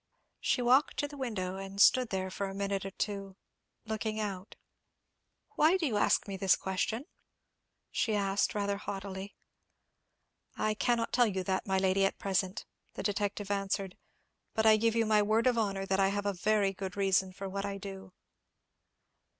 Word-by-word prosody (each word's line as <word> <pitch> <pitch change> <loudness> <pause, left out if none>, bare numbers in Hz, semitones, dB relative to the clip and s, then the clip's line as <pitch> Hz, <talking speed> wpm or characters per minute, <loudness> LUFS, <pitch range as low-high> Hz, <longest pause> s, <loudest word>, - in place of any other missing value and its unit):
She 250 - +1
walked 260 +5 +4
to 290 - 0
the 290 - -11
window, 205 -9 -3
and 195 0 -7
stood 250 +3 +6
there 190 -1 -2
for 200 +1 -3
a 195 - -7
minute 195 -1 -2
or - - -7
so, 195 -2 -3 0.5
looking 220 0 -3
out. 195 -2 -4 1.0
"Why 320 +5 +5
do 350 - -1
you 240 -7 0
ask - - +2
me 195 -1 -4
this 190 0 +4
question?" 220 +7 -2 0.9
she 220 -3 0
asked, 200 0 +1
rather 200 -1 0
haughtily. 195 0 -6 1.2
"I 215 - +1
cannot 230 +2 0
tell 245 -1 +5
you 190 -3 -2
that, 190 +2 -1
my 190 0 +1
lady, 190 +1 +2
at 195 - +1
present," 190 -1 -1 0.3
the - - -5
detective 205 0 -2
answered; 195 -1 -2 0.6
"but 220 -1 +1
I 220 0 +8
give 225 +1 +1
you 230 -1 +3
my 215 -1 +4
word 215 +3 +2
of 250 -1 +4
honour 195 -4 -1
that 195 0 0
I 195 - +4
have 200 +1 -2
a 200 - +1
very 200 +1 +1
good 190 0 -6
reason 190 -1 +2
for 195 +1 -6
what 195 +1 -3
I 200 0 -3
do." 195 -1 -8
200 Hz, 175 wpm, -31 LUFS, 195-215 Hz, 1.2 s, I